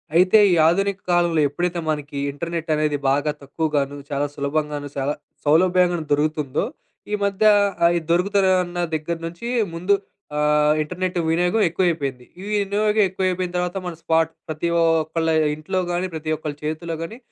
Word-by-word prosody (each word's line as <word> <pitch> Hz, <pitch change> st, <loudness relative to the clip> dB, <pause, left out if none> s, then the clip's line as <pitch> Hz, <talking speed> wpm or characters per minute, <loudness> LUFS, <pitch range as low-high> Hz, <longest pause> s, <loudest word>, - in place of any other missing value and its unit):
అయితే, 185 Hz, +4 st, +6 dB, 0.2 s
ఈ -, -, +4 dB
ఆధునిక 195 Hz, +3 st, +1 dB
కాలంలో 175 Hz, -3 st, +3 dB
ఎప్పుడైతే 175 Hz, +3 st, -2 dB
మనకి 145 Hz, -2 st, -3 dB
ఇంటర్‌నెట్ 165 Hz, +3 st, -5 dB
అనేది 150 Hz, -1 st, 0 dB
బాగా 145 Hz, +2 st, +1 dB
తక్కువగాను, 145 Hz, -1 st, -2 dB
చాలా 145 Hz, 0 st, 0 dB
సులభంగాను, 145 Hz, 0 st, -2 dB
చాలా 140 Hz, +2 st, 0 dB, 0.3 s
సౌలభ్యంగాను 175 Hz, +1 st, +3 dB
దొరుగుతుందో 150 Hz, -1 st, 0 dB, 0.5 s
ఈ -, -, -1 dB
మధ్య 200 Hz, +1 st, +1 dB, 0.4 s
ఆయి 170 Hz, 0 st, +4 dB
దొరుగుతలే 190 Hz, +2 st, +3 dB
అన్నా 175 Hz, 0 st, -4 dB
దగ్గర 155 Hz, +2 st, -3 dB
నుంచి 170 Hz, +8 st, -7 dB, 0.3 s
ముందు 180 Hz, +4 st, +1 dB, 0.4 s
ఆహ్, 150 Hz, 0 st, +3 dB
ఇంటర్‌నెట్ 180 Hz, +3 st, -3 dB
వినియోగం 175 Hz, +6 st, +2 dB
ఎక్కువైపోయింది. 155 Hz, -8 st, -1 dB, 0.2 s
ఈ -, -, -8 dB
వినియోగం 210 Hz, +1 st, +1 dB
ఎక్కువైపోయిన 185 Hz, -1 st, -1 dB
తర్వాత 180 Hz, +1 st, -1 dB
మన 175 Hz, -, -4 dB
స్పాట్ 160 Hz, 0 st, +2 dB, 0.2 s
ప్రతి 155 Hz, +2 st, -2 dB
ఓక్కళ్ళ 165 Hz, 0 st, +1 dB, 0.3 s
ఇంట్లో 185 Hz, +5 st, -3 dB
గానీ, 175 Hz, +1 st, -1 dB
ప్రతి 155 Hz, 0 st, -5 dB
ఒక్కళ్ళ 150 Hz, -1 st, -5 dB
చేతిలో 160 Hz, +2 st, -3 dB
గాని 190 Hz, +8 st, -6 dB
165 Hz, 140 wpm, -22 LUFS, 150-180 Hz, 0.5 s, అయితే